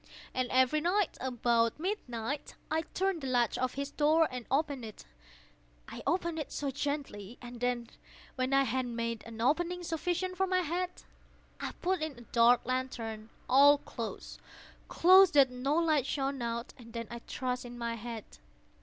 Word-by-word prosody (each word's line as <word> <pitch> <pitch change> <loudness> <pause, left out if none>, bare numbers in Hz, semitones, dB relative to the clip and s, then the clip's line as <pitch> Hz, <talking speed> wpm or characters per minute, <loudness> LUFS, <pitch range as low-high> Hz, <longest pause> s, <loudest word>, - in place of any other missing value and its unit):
And 255 -1 -1
every 260 +4 +3
night, 370 +3 +1
about 235 -1 +1
midnight, 285 - -3 0.2
I 320 +1 +2
turned 375 +1 -2
the 270 - -4
latch 245 -3 +2
of 255 0 -1
his 280 +1 -3
door 310 +2 +4
and 250 -2 -6
opened 280 -2 0
it—oh, - - -7 0.3
so 280 -2 -3
gently! 270 -7 -4
And 240 0 -9
then, 245 -1 -1 0.5
when 255 0 -1
I 275 0 +5
had 255 0 -1
made 230 -1 -3
an 230 -1 -9
opening 350 +7 +1
sufficient 355 +2 -2
for 385 +1 +2
my 370 0 +2
head, 355 +2 -1 0.7
I - - -4
put 365 -1 +1
in 310 -4 -3
a - - -11
dark 235 +1 +4
lantern, 230 -4 -3 0.2
all 285 +3 +7
closed, - - -7 0.5
closed, 370 -1 +6
that 270 -3 +6
no 260 +4 -1
light 310 -5 +2
shone 275 -2 -1
out, 235 +1 -3
and 230 -2 -13
then 230 -1 -4
I 235 - -5
thrust 250 +1 -3
in 245 0 -9
my 235 -1 -2
head. 230 -1 -6
260 Hz, 160 wpm, -31 LUFS, 235-310 Hz, 0.7 s, all